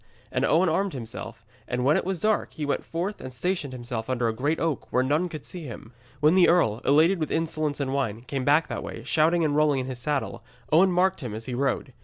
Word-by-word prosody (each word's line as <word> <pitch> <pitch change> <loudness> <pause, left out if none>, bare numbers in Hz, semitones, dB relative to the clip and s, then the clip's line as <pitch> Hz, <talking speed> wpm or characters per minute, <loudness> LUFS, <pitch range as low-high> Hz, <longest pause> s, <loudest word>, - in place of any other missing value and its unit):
And - - 0
Owen 175 +4 +3
armed 190 +4 0
himself, 115 -2 -7 0.2
and 125 0 -1
when 145 +3 +4
it - - +1
was 190 -2 -2
dark 215 0 +1
he 155 - -4
went 145 - -1
forth 180 +5 -4
and 130 - -7
stationed 150 +2 -2
himself 120 -2 -5
under 125 -2 0
a 115 - 0
great 145 +8 -1
oak, 165 -4 -2
where 125 - +2
none 150 +7 +1
could 155 -3 -8
see 175 -4 -7
him. 115 -1 -9 0.3
When 150 +2 +5
the 185 -1 +6
earl, 120 -11 +3
elated 160 +6 +4
with 155 - -2
insolence 155 -2 -1
and 135 -1 -1
wine, 115 -6 -1
came 130 +1 -4
back 150 +4 +3
that - - -4
way, - - -7
shouting 165 +1 +2
and 145 -1 0
rolling 150 -2 +3
in - - -4
his 130 -1 -6
saddle, 140 +2 -2 0.3
Owen 180 +5 +5
marked 185 0 +2
him 120 -5 -5
as 110 +1 -6
he 130 - -5
rode. 130 0 -1
145 Hz, 240 wpm, -26 LUFS, 125-165 Hz, 0.3 s, the